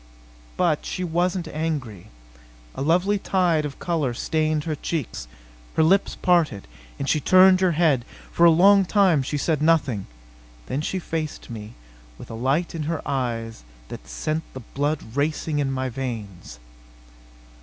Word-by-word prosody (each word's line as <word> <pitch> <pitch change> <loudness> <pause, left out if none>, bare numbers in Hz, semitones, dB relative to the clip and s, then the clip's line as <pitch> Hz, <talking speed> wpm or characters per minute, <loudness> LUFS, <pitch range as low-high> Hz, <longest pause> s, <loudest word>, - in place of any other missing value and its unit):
But 170 -5 +1
she 185 - -4
wasn't 175 +1 -1
angry. 150 - -4 0.7
A - - -6
lovely 180 +7 +2
tide 175 -6 +1
of 145 - -6
color 155 -8 -1
stained 155 +2 0
her 160 - -2
cheeks. 150 - -4 0.5
Her 160 - +4
lips 195 +5 +3
parted, 165 - +1 0.3
and 140 - -4
she 155 - +2
turned 185 +4 +6
her 185 -2 +3
head. 150 -6 +2 0.3
For 170 - +1
a - - +8
long 195 +4 +6
time 185 -5 +3
she 140 +3 -3
said 150 0 0
nothing. 145 -10 +2 0.6
Then 135 - -2
she 190 - -2
faced 160 -6 -5
me, 110 -1 -8 0.4
with - - -11
a - - -6
light 135 +9 0
in 165 - -4
her 165 -2 -3
eyes 115 - -3 0.3
that - - -9
sent 155 - -2
the 130 - -6
blood 145 +5 -2
racing 150 +1 -1
in 140 -2 0
my 130 0 -2
veins. 110 - -6
155 Hz, 155 wpm, -23 LUFS, 130-170 Hz, 0.7 s, a